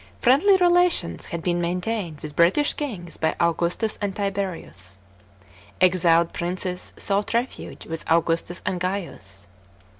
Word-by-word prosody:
Friendly 300 +11 +5
relations 355 - +2
had 170 -1 -5
been 175 -1 +1
maintained 180 -1 -2
with 150 -1 -7
British 185 - +3
kings 200 - -5
by 160 - 0
Augustus 170 +6 0
and 200 -2 -2
Tiberius. 190 - -4 0.8
Exiled 170 -2 +4
princes 180 +1 -3
sought 200 +2 -1
refuge 240 +2 -3
with 165 0 -4
Augustus 165 +1 +1
and 180 - -1
Gaius. 170 - -4
180 Hz, 120 wpm, -24 LUFS, 170-205 Hz, 0.8 s, Friendly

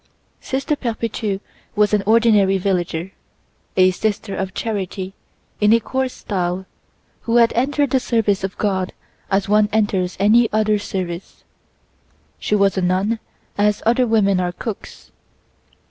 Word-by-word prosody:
Sister 275 +3 -2
Perpétue 225 -5 -3 0.3
was 210 0 +3
an 210 - +3
ordinary 215 -4 +4
villager, 180 -2 -1 0.7
a 185 0 +6
sister 205 +1 -2
of 190 -1 -4
charity 195 -3 -3 0.5
in 210 0 +4
a 230 - +5
coarse 260 +3 -2
style, 185 -1 -3 0.6
who 230 - +2
had 230 -1 +5
entered 280 +3 +1
the 265 - +3
service 220 -6 0
of 195 - -4
God 190 -3 -1 0.4
as 195 0 +1
one 210 0 +3
enters 195 -4 0
any 220 +3 +4
other 215 -1 +2
service. 185 -3 -5 1.0
She 210 - 0
was 195 -2 +2
a - - -1
nun 190 +5 +1 0.4
as 210 0 +2
other 240 +2 +3
women 200 -4 +3
are 180 -1 0
cooks. 220 +2 -8
205 Hz, 135 wpm, -20 LUFS, 190-225 Hz, 1.0 s, a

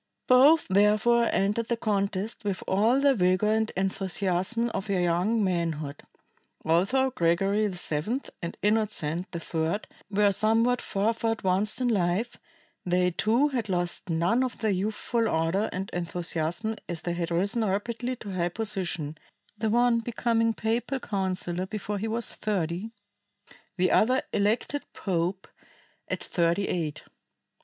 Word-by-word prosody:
Both 280 +6 +6
therefore 215 +4 +3
entered 210 +4 0
the 235 - 0
contest 200 0 -1
with 200 -3 -2
all 220 +7 +3
the 280 0 +4
vigor 185 0 +2
and 220 0 +1
enthusiasm 195 +3 0
of 195 - -3
their 195 -2 0
young 180 +6 +1
manhood. 165 -6 -2 0.6
Although 200 +12 +2
Gregory 195 +3 +2
VII 180 - -1 0.2
and 170 - -5
Innocent 205 -6 0
III 165 +2 -1 0.3
were 205 0 +3
somewhat 225 +5 +2
farther 225 +3 -1
advanced 195 +1 0
in 250 - +2
life, 205 +2 0 0.5
they 180 0 +2
too 230 - +2
had 240 -7 -3
lost 175 0 -1
none 175 +10 +2
of 255 - -3
their 220 -2 0
youthful 215 +4 -1
ardor 165 +5 +1
and 190 +1 -4
enthusiasm 175 +4 -2
as 170 -2 -5
they 175 - -1
had 170 -1 -2
risen 200 +7 0
rapidly 230 +5 -2
to 205 -5 -8
high 175 -1 0
position, 175 -7 -3 0.4
the 215 +1 -1
one 240 +1 +3
becoming 230 -1 0
papal 235 +4 -1
counsellor 185 -4 -2
before 210 0 -4
he 220 - -2
was 230 +1 -2
thirty, 190 -1 -2 0.9
the 185 0 +2
other 255 +4 +3
elected 220 +8 0
pope 185 0 -2 0.6
at - - -3
thirty 170 +3 +1
eight. 155 -4 -3
200 Hz, 135 wpm, -27 LUFS, 175-225 Hz, 0.9 s, Both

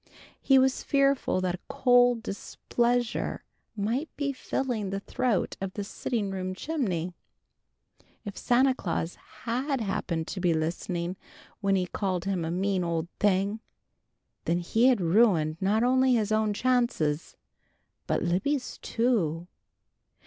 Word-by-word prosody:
He 270 - +5
was 265 0 +3
fearful 275 -8 +2
that 180 -1 0
a 180 - -6
cold 245 -2 +4
displeasure 240 +3 -1 0.3
might 230 +9 -1
be 280 -1 -1
filling 245 -5 -2
the 195 +1 -2
throat 235 0 -1
of 190 -1 -3
the 205 - -3
sitting 205 0 -3
room 185 -1 -3
chimney. 190 - -2 1.1
If 205 - -6
Santa 260 +2 +3
Claus 175 -7 -3 0.3
had 260 +4 -1
happened 185 -6 -2
to 195 - -4
be 175 -2 +2
listening 170 +2 -2 0.4
when 195 -1 +2
he 185 -1 +1
called 185 -1 -2
him 190 -3 -1
a 160 - -2
mean 185 +1 0
old 170 0 -2
thing, 200 +1 +2 0.9
then 170 - +1
had 175 - -4
he 245 +3 +5
ruined 170 -5 +3
not 210 +4 +2
only 255 0 +4
his 220 -2 0
own 215 -1 +2
chances, 205 -10 0 0.7
but - - 0
Libby's 245 +11 -1
too. 185 -9 0
205 Hz, 135 wpm, -28 LUFS, 180-245 Hz, 1.1 s, He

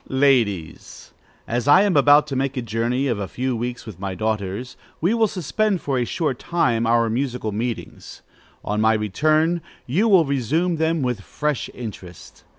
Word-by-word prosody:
_ - - -35
Ladies, 120 - 0 0.4
As 120 +3 -2
I 145 +7 +7
am 200 -3 +1
about 145 +1 +6
to 145 -3 -5
make 135 +1 -1
a 125 - -2
journey 115 +4 -1
of 120 -6 -1
a 100 - -3
few 130 +4 -2
weeks 120 +2 -4
with 105 -6 -10
my 95 -1 -4
daughters, 110 +3 -3 0.2
we 180 +7 +1
will 225 -1 +3
suspend 200 +2 -1
for 135 -5 -1
a 120 - 0
short 145 -3 -2
time 120 -10 0
our 115 0 +3
musical 120 -1 -2
meetings. 115 +2 -5 0.4
On 105 +1 -1
my 110 0 +4
return, 155 - +1 0.2
you 180 - +1
will 190 -6 +5
resume 150 +6 0
them 160 -1 0
with 125 -5 -2
fresh 150 +6 -3
interest. 95 -7 -10
125 Hz, 175 wpm, -22 LUFS, 110-155 Hz, 0.4 s, I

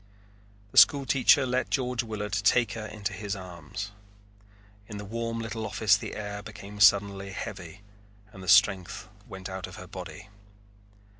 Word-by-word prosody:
The - - +7
school 140 -1 +6
teacher 135 +1 +4
let 125 0 -1
George 125 -2 0
Willard 105 -3 -5
take 100 +3 +3
her 110 -1 -5
into 105 -1 -4
his 100 +2 -4
arms. 90 +1 -7 1.0
In 105 - -7
the 105 - -7
warm 115 +2 -3
little 110 -1 -4
office 105 0 +3
the 95 - -5
air 105 -1 -5
became 105 -1 -10
suddenly 100 -1 +4
heavy 95 -1 -7 0.5
and 95 - -12
the 95 - -9
strength 95 -3 +3 0.2
went 95 -1 -8
out 95 -2 -6
of - - -11
her - - -9
body. 100 0 -9
105 Hz, 155 wpm, -28 LUFS, 95-110 Hz, 1.0 s, The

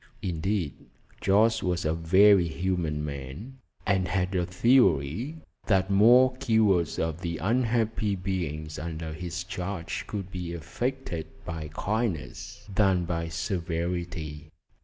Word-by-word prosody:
Indeed, 90 -2 -1 0.5
Jorce 110 +3 +4
was 90 -2 -1
a 80 - +2
very 95 +3 +5
humane 80 -3 -1
man, 70 - -7 0.3
and 95 -2 +2
had 90 0 0
a 90 -2 0
theory 95 - +3 0.3
that 95 -2 +2
more 125 +6 +6
cures 105 - +2
of 80 +1 -2
the 85 -2 -3
unhappy 110 -1 +1
beings 85 -5 -3
under 80 0 -5
his 90 +1 -5
charge 90 -1 -4
could 95 -3 -5
be 90 -2 -5
effected 85 - -3 0.2
by 80 -3 -5
kindness 100 - -3
than 95 -3 +3
by 85 -1 -2
severity. 85 -2 -3
90 Hz, 115 wpm, -27 LUFS, 80-100 Hz, 0.5 s, more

